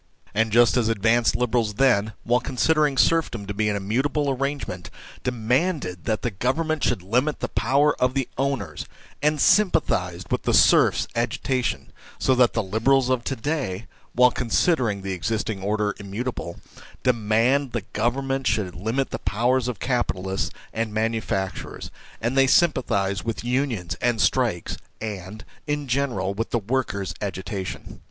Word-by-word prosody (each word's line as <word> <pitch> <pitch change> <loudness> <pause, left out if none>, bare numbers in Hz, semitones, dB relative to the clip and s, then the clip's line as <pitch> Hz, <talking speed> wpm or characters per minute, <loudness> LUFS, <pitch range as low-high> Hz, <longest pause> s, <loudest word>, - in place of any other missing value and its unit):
And 110 +1 +1
just 120 +2 +5
as 115 -2 +2
advanced 115 +2 +2
Liberals 115 -3 0
then, 110 -5 +3
while 120 +2 +2
considering 145 +2 +1
serfdom 155 -11 +2
to 100 - -4
be 105 +1 0
an 105 - 0
immutable 135 +9 0
arrange 140 +2 -2
ment, 90 -1 -7 0.3
demanded 125 - -1
that 110 -1 -1
the 120 - 0
Government 155 - -1
should 90 - 0
limit 125 +10 0
the - - -2
power 140 +5 +2
of 125 +1 +2
the 135 -2 0
owners, 135 0 -2 0.3
and 150 0 +2
sympathised 100 - +2
with - - +1
the - - +1
serfs' - - +5
agitation, 125 +2 -1 0.2
so 130 - +2
the 120 -3 +3
Liberals 125 +6 +2
of 125 -2 +1
to 135 - -1
day, 115 -7 -3 0.3
while 125 0 +5
considering 120 - +1
the 95 - -3
existing 105 +2 -2
order 105 +1 0
im 100 -1 -9
mutable, 105 -5 -4 0.4
demand 120 +3 +2
that 110 -3 -5
Government 135 +4 0
should 105 -5 0
limit 110 +10 -2
the - - -3
powers 125 +4 +1
of 125 -4 -3
capitalists 95 -7 -1 0.2
and 110 -1 -2
manufacturers, 110 -3 -2 0.3
and 115 +4 -1
they 135 0 +5
sympathise 100 - +2
with 115 +1 -3
unions, 120 -8 -1
and 120 -2 +1
strikes, 115 -7 +1 0.2
and, 105 -1 -6 0.2
in 145 -1 -2
general, 120 -7 0
with 115 +3 -3
the - - 0
workers' 105 -6 -2
agitation. 95 0 -5
115 Hz, 150 wpm, -24 LUFS, 105-135 Hz, 0.4 s, just